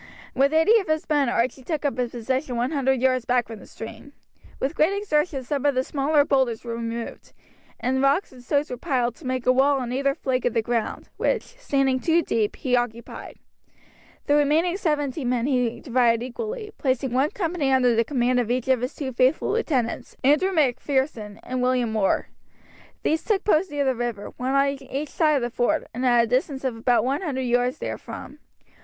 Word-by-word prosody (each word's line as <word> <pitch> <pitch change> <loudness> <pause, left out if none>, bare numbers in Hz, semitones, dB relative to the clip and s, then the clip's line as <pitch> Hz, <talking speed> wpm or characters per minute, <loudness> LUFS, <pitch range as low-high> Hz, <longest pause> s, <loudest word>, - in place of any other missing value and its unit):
With 275 +2 +3
eighty 325 +9 +5
of 385 - -5
his 310 0 -1
men 290 -5 +2
Archie 245 +3 0
took 310 +1 -3
up 270 -3 -1
a 250 - +1
position 250 +3 -3
one 245 +4 0
hundred 265 -3 +1
yards 255 -2 +2
back 245 -1 +2
from 225 -2 -9
the - - -14
stream. 275 +5 -10 0.5
With 275 +4 -1
great 335 +6 +2
exertions 300 -8 -1
some 285 -3 -1
of 285 -2 +2
the 255 - +2
smaller 285 +1 +2
boulders 260 -6 +1
were 235 -1 -5
removed, 230 0 -6 0.5
and 260 +1 0
rocks 275 +8 +2
and 250 -2 -14
stones 285 +3 0
were 250 - -4
piled 245 -4 0
to 280 - -9
make 255 -1 -2
a 255 - +5
wall 275 +2 +3
on 245 -2 -4
either 275 +1 +1
flank 260 -5 -1
of 245 -1 0
the 225 - +2
ground, 235 -1 -2
which, - - +1
standing 275 - 0
two 330 +4 +2
deep, 215 -6 0
he 250 -2 0
occupied. 240 -1 -4 0.9
The 290 - +2
remaining 305 +5 +3
seventy 300 -6 -1
men 245 -1 0
he 250 -4 0
divided 240 -3 +2
equally, 430 - -5
placing 260 -1 0
one 270 +4 +2
company 340 -8 -1
under 250 -2 +4
the 230 - +3
command 250 -1 +1
of 235 -2 -1
each 250 +1 -1
of 260 -3 +3
his 250 - -3
two 265 -3 -4
faithful 255 +5 +2
lieutenants, 270 - -1
Andrew 300 +8 +4
Macpherson 265 - 0
and 255 0 -3
William 250 -3 +1
Orr. 200 -3 +1 0.8
These 315 0 +1
took 415 -3 0
post 370 -2 +2
near 290 -1 -1
the 265 - +2
river, 240 -4 -4
one 260 +2 -1
on 275 0 +2
each 275 +3 -5
side 310 -2 +2
of 270 - 0
the 240 - -2
ford, 240 0 0
and 250 +3 -4
at 240 -1 +5
a - - +1
distance 265 +3 -1
of 260 -3 -1
about 235 0 +2
one 275 +6 0
hundred 285 -8 -2
yards 245 +2 +1
therefrom. - - -7
260 Hz, 200 wpm, -24 LUFS, 245-295 Hz, 0.9 s, eighty